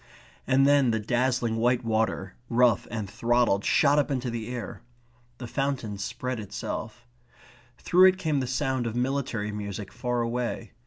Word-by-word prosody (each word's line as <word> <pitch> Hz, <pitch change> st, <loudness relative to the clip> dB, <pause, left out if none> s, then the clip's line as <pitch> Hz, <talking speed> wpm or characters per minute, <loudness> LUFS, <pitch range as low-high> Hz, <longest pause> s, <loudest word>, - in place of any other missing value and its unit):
And 135 Hz, +1 st, +4 dB
then 140 Hz, -2 st, +4 dB
the 110 Hz, -1 st, +1 dB
dazzling 120 Hz, +1 st, 0 dB
white 120 Hz, +2 st, +2 dB
water, 110 Hz, -4 st, -1 dB, 0.2 s
rough 120 Hz, -3 st, +3 dB
and 110 Hz, -3 st, -4 dB
throttled, 115 Hz, -1 st, +1 dB
shot 145 Hz, 0 st, +4 dB
up 145 Hz, -, 0 dB
into 130 Hz, -3 st, -2 dB
the 115 Hz, -2 st, -4 dB
air. 120 Hz, -1 st, -6 dB, 0.6 s
The 125 Hz, -, -7 dB
fountain 120 Hz, -5 st, -2 dB
spread 125 Hz, +4 st, -4 dB
itself. 110 Hz, +3 st, -6 dB, 0.7 s
Through 185 Hz, +2 st, +5 dB
it 185 Hz, 0 st, +3 dB
came 155 Hz, -7 st, 0 dB
the 130 Hz, -, -2 dB
sound 130 Hz, -1 st, -1 dB
of 115 Hz, -, -4 dB
military 125 Hz, -4 st, -1 dB
music 100 Hz, -1 st, -6 dB
far 125 Hz, -1 st, -1 dB
away. 115 Hz, -1 st, -3 dB
120 Hz, 155 wpm, -27 LUFS, 110-130 Hz, 0.7 s, Through